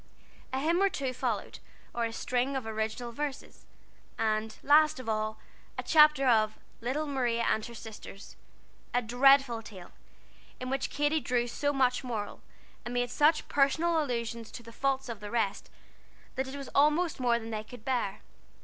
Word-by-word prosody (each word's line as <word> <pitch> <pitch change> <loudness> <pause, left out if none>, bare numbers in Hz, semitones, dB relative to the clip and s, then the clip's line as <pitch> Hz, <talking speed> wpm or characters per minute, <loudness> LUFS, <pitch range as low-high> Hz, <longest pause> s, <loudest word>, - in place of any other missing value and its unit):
A 260 - -1
hymn 335 +6 +2
or 395 - +4
two 270 -7 -3
followed, 245 -4 -3 0.3
or 235 -1 0
a 230 - -3
string 250 +4 -1
of 260 -3 -2
original 220 +2 -3
verses, 285 +2 -6 0.5
and, 220 -1 -1
last 305 0 +5
of 255 - -8
all, 215 0 -1 0.4
a - - -3
chapter 300 -3 +6
of 215 -3 +3 0.2
"Little 260 +6 -2
Maria 245 -5 0
and 220 - +1
Her 235 - -8
Sisters," 215 -3 -10 0.6
a 245 - +2
dreadful 245 0 +4
tale, 190 -5 -11 0.7
in 255 0 -4
which 270 - -1
Katy 295 +2 +1
drew 245 -4 0
so 285 +4 -1
much 255 -2 +1
moral, 225 -5 -4 0.4
and 240 +1 -5
made 245 0 0
such 300 +4 +3
personal 320 +4 +2
allusions 235 -4 -3
to 240 - -8
the 230 - -11
faults 270 0 0
of 230 -3 -6
the 210 -1 -7
rest, 225 -4 -1 0.6
that 265 0 -2
it 265 - -7
was 275 -2 -7
almost 300 +3 +3
more 240 -2 +3
than 225 -1 -7
they 215 -1 -3
could 240 0 -13
bear. 245 -7 -1
245 Hz, 170 wpm, -30 LUFS, 225-275 Hz, 0.7 s, chapter